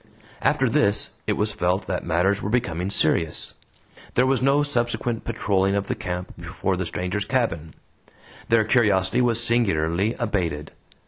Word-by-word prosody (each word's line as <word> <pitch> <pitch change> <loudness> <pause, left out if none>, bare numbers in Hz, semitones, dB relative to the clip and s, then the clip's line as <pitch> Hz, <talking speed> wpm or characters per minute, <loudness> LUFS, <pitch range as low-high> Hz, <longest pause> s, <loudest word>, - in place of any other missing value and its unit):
After - - +2
this 100 +1 +2 0.2
it - - +2
was 105 +1 +1
felt 95 -2 -1
that 90 - -3
matters 90 +4 +1
were 100 - -3
becoming 95 -6 -1
serious. 80 -4 +1 0.6
There 125 - +4
was 130 0 +1
no 140 +2 +3
subsequent 120 -3 -1
patrolling 100 -4 0
of 100 0 -1
the - - -2
camp 90 0 -5
before 90 +2 -2
the 90 -1 -3
stranger's 90 +4 -3
cabin. 95 - -2 0.7
Their 115 -1 +4
curiosity 105 -3 +2
was 120 -1 +3
singularly 100 -3 +1
abated. 90 -10 -2
100 Hz, 145 wpm, -23 LUFS, 90-115 Hz, 0.7 s, There